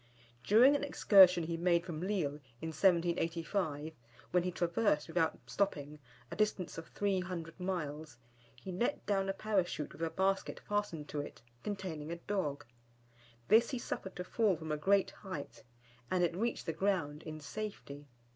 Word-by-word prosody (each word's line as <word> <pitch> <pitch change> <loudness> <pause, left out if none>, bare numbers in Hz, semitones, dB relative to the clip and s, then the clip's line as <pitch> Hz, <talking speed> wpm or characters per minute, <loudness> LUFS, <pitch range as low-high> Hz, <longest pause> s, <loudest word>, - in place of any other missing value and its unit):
During 240 - +6
an 285 - -1
excursion 190 -10 +6
he 165 +1 -2
made 170 0 +2
from 165 -3 -5
Lille, 175 -7 -1 0.2
in 160 - -4
1785, 165 -2 +1 0.4
when 180 - +4
he 180 +1 -2
traversed, 170 -2 +1
without 165 -1 +1
stopping, 150 -7 -2 0.3
a - - -4
distance 205 -5 0
of 165 - -9
300 185 -4 -2
miles, 155 -6 -4 0.4
he 155 +10 -8
let 235 +10 -1
down 195 -1 +1
a - - +1
Parachute 195 -7 -1
with - - -12
a 165 - +1
basket 190 +3 0
fastened 205 -8 -1
to 145 - -2
it 145 - -10 0.2
containing 180 -7 -4
a - - -2
dog. 170 -6 -3 0.8
This 230 +2 +6
he 260 - -2
suffered 190 -5 -5
to 180 - -4
fall 205 0 +2
from 160 -1 -6
a - - +1
great 195 +6 +3
height, 185 -8 -7 0.5
and 180 -1 +2
it 170 -1 +1
reached 230 +5 -1
the 165 - -1
ground 165 -5 0
in 155 -1 -7
safety. 145 -4 -6
175 Hz, 160 wpm, -34 LUFS, 160-195 Hz, 0.8 s, During